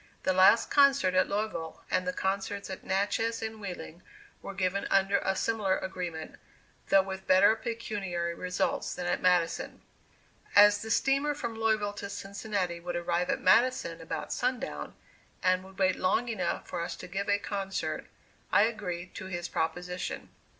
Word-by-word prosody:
The 185 - +2
last 190 +5 +5
concert 275 -10 +5
at 185 - +3
Louisville, 200 -6 -3
and 185 - +1
the - - +2
concerts 195 +1 -2
at 190 - -7
Natchez 210 +4 0
and 220 -1 -5
Wheeling 175 -3 -7 0.4
were 200 - -7
given 190 +1 0
under 195 +1 +3
a 190 - 0
similar 205 -3 +1
agreement, 175 -4 -5 0.5
though 195 -1 +6
with 190 0 -7
better 195 +4 +6
pecuniary 205 -7 -3
results 180 +1 -2
than 180 - -4
at 175 - 0
Madison. 180 -2 +1 0.7
As 205 0 +7
the 220 - -6
steamer 275 +6 +2
from 235 -5 -4
Louisville 220 -2 +1
to 200 -1 -6
Cincinnati 195 -3 -3
would 175 0 -5
arrive 175 +1 0
at - - 0
Madison 220 -5 +3
about 160 - -4
sundown, 250 0 -3 0.5
and 185 0 +3
would 190 0 -15
wait 185 -1 +3
long 225 +6 +1
enough 185 -7 -2
for 175 - -3
us 170 0 -3
to 180 - -9
give 195 +3 -3
a 205 - +4
concert, 195 -1 -3 0.4
I 200 - +6
agreed 185 -6 -3
to 185 - -7
his 175 -2 -4
proposition. 180 +2 -3
190 Hz, 160 wpm, -29 LUFS, 180-215 Hz, 0.7 s, As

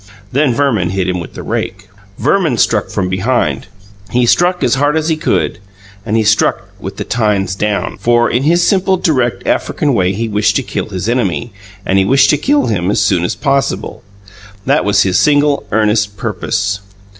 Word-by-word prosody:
Then 140 0 +2
Verman 115 -11 +1
hit 95 0 -1
him 90 -1 -1
with 85 - -9
the - - -7
rake. 100 +1 -4 0.3
Verman 150 - +1
struck 105 -1 +1
from 95 -3 -2
behind. 95 - -1 0.4
He 125 0 +1
struck 175 +8 +2
as 120 - +2
hard 145 +3 +1
as 160 +1 -1
he 160 - +2
could. 155 - -1 0.5
And 110 +1 +1
he 110 - +2
struck 105 -2 +1
with 95 0 -7
the - - -3
tines 105 -5 0
down 105 +1 -2
For, 120 0 +2
in 120 - 0
his 170 +4 +2
simple, 190 -1 +2
direct 130 -9 0
African 145 -3 0
way 90 -5 +1
he 115 +4 -2
wished 105 -1 +1
to - - +1
kill - - -4
his 95 +1 -4
enemy, 120 -2 -1 0.3
and 95 - +2
he 95 - +2
wished 135 +5 +4
to 150 - +2
kill 290 - +2
him 95 -4 -1
as 105 - +1
soon 95 -4 +1
as 90 - -1
possible. 135 -7 -1 0.6
That - - +2
was 100 - +3
his 95 -2 +1
single, 145 -1 +2
earnest 105 -1 +1
purpose. 100 -2 -2
110 Hz, 190 wpm, -14 LUFS, 100-140 Hz, 0.6 s, wished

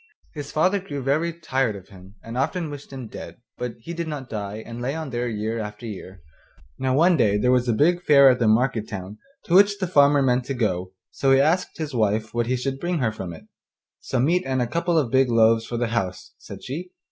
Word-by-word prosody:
His 145 -2 -7
father 185 +6 +2
grew 145 -8 -6
very 155 +6 +1
tired 135 -9 -1
of 95 -2 -12
him 95 0 -15
and 115 +1 -8
often 155 +4 -1
wished 145 -1 -10
him 130 -2 -7
dead, - - -9 0.2
but 125 -2 -4
he 170 +9 -7
did 170 -1 -4
not 145 -4 -6
die, 105 0 -5
but 115 - -8
lay 125 +4 -3
on 160 -4 -5
there 120 0 -2
year 110 +1 -3
after 105 +1 -7
year. 95 -5 -9 0.6
Now 130 0 +1
one 170 +5 +5
day 105 -5 +3
there 125 +4 +2
was 125 -1 +2
a - - +4
big 170 +10 +2
fair 140 -5 +6
at 125 -2 +5
the 115 - +2
market 115 0 +2
town 95 +1 -7 0.3
to 170 - -2
which 200 +2 +6
the 195 - -1
farmer 145 -4 +4
meant 125 -1 +1
to 135 - -3
go, 95 -6 -1 0.2
so 135 - +1
he 135 - +6
asked 165 +6 +1
his 155 -3 -4
wife 110 -1 0
what 120 -1 0
he 130 - +1
should 135 +2 -3
bring 175 +2 -1
her 120 -7 0
from 95 -5 -7
it. 80 - -11 0.5
'Some 125 0 -1
meat 175 +4 +2
and 130 -4 -1
a 125 - +1
couple 170 +6 0
of 135 -7 +1
big 130 0 +3
loaves 115 -1 +3
for 120 - -4
the 120 -1 -1
house,' 95 -6 -3
said - - -11
she. 165 +8 -6
125 Hz, 240 wpm, -23 LUFS, 110-150 Hz, 0.6 s, fair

